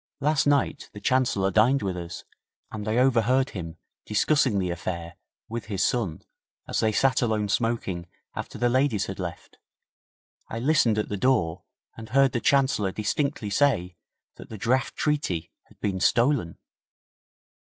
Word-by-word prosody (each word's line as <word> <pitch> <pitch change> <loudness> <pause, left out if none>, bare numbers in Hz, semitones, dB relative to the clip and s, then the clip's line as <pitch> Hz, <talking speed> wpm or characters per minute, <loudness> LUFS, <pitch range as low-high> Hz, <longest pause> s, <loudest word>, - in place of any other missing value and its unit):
'Last 150 0 +2
night 145 -1 +1
the 105 - -8
Chancellor 100 -4 +1
dined 115 +7 +3
with 95 -2 -2
us, 85 0 -7 0.5
and 110 0 -6
I 110 +2 +1
overheard 130 +1 +3
him 85 -4 -7 0.3
discussing 120 +2 +2
the 90 -2 0
affair 85 0 -5 0.3
with 115 +1 -5
his 100 -3 -1
son 105 -11 -1 0.4
as - - -1
they 110 - +2
sat 135 +5 +2
alone 110 -3 0
smoking 100 -5 -1 0.3
after - - -6
the 120 - +2
ladies 125 -4 +2
had 95 - -7
left. 85 -2 -7 0.9
I 115 - -5
listened 120 -4 +3
at 105 - -1
the 105 - -2
door 95 -9 +1 0.3
and 110 0 -10
heard 135 +2 +4
the 120 - -1
Chancellor 130 -8 +2
distinctly 110 +1 -2
say 95 -9 +2 0.4
that - - -12
the 110 - -7
draft 125 +5 0
treaty 95 - -1
had - - -24
been 95 -2 -1
stolen.' 120 - +2
110 Hz, 150 wpm, -26 LUFS, 95-130 Hz, 0.9 s, heard